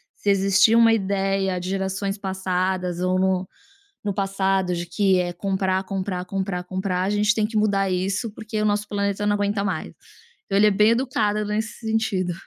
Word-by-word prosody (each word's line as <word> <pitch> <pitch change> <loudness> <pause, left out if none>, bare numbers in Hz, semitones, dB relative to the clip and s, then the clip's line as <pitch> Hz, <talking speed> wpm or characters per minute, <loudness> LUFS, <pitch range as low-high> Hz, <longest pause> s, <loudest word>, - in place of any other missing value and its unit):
Se 205 - -2
existir 195 +3 +4
uma 230 -1 +6
ideia 195 -2 0
de 180 +1 -5
gerações 195 +1 -2
passadas 185 -2 -2
ou 185 +1 +1
no 190 0 +1 0.6
no 200 -1 -1
passado 195 -2 0
de 175 0 -4
que 190 +2 +2
é 180 -1 0
comprar, 190 +1 -1
comprar, 190 -1 -3
comprar, 190 -1 -3
comprar, 185 0 -2
a 195 - 0
gente 210 +1 +2
tem 215 -2 +1
que 220 - -12
mudar 200 -2 +2
isso, 190 +4 -1
porque 215 0 -5
o - - +1
nosso 210 0 +1
planeta 200 0 -1
não 205 - +3
aguenta 205 0 -1
mais". 205 - -2 0.6
Então 195 - 0
ele 210 +1 +6
é - - +4
bem 210 +2 +4
educada 215 -4 0
nesse 220 +2 -3
sentido. 200 -5 0
195 Hz, 185 wpm, -23 LUFS, 185-210 Hz, 0.6 s, uma